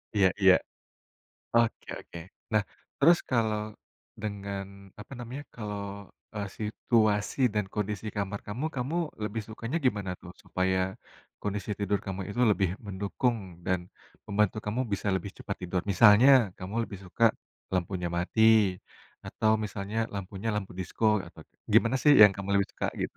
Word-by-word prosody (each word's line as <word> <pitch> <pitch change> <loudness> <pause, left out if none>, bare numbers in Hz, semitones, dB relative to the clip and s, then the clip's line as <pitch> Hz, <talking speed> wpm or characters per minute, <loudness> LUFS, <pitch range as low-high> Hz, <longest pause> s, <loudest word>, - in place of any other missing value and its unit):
Iya 100 -2 +5
iya. 95 -1 +8 1.0
Oke 115 -1 +2
oke. 85 - -11 0.3
Nah, 110 -1 +4 0.4
terus 170 +4 +6
kalau 110 -4 +1 0.6
dengan, 100 -2 -4 0.4
apa 105 - -11
namanya 125 +4 -6
kalau, 105 -3 -5 0.5
eee, 105 -1 -3
situasi 110 0 +1 0.2
dan 105 -1 +1
kondisi 105 0 -2
kamar 100 0 -2
kamu, 115 +8 -4
kamu 130 +5 -2 0.3
lebih 110 +1 -3
sukanya 115 +6 -4
gimana 105 -6 0
tuh, 90 - -11
supaya 95 0 0 0.6
kondisi 105 +1 -3
tidur 100 0 0
kamu 95 0 -4
itu 120 - -3
lebih 100 -3 +2 0.2
mendukung 100 +5 -1 0.3
dan 95 -1 +1 0.5
membantu 105 0 +1
kamu 105 +4 -1
bisa 100 +1 -1
lebih 100 +1 -5
cepat 100 - -5
tidur. 90 +1 -1
Misalnya, 105 +6 +7 0.3
kamu 95 +3 -7
lebih 100 - -8
suka 95 +5 0 0.5
lampunya 90 0 -1
mati, 95 +5 0 0.8
atau 110 - +1
misalnya 100 +1 -5 0.2
lampunya 100 +2 -5
lampu 105 -2 -3
disko, 95 +4 -4 0.2
atau - - -13 0.3
gimana 130 - +5
sih 150 - +7
yang 105 - +10
kamu 100 0 -6
lebih 100 - +1
suka, - - -2 0.2
gitu? - - -4
105 Hz, 140 wpm, -29 LUFS, 100-110 Hz, 1.0 s, yang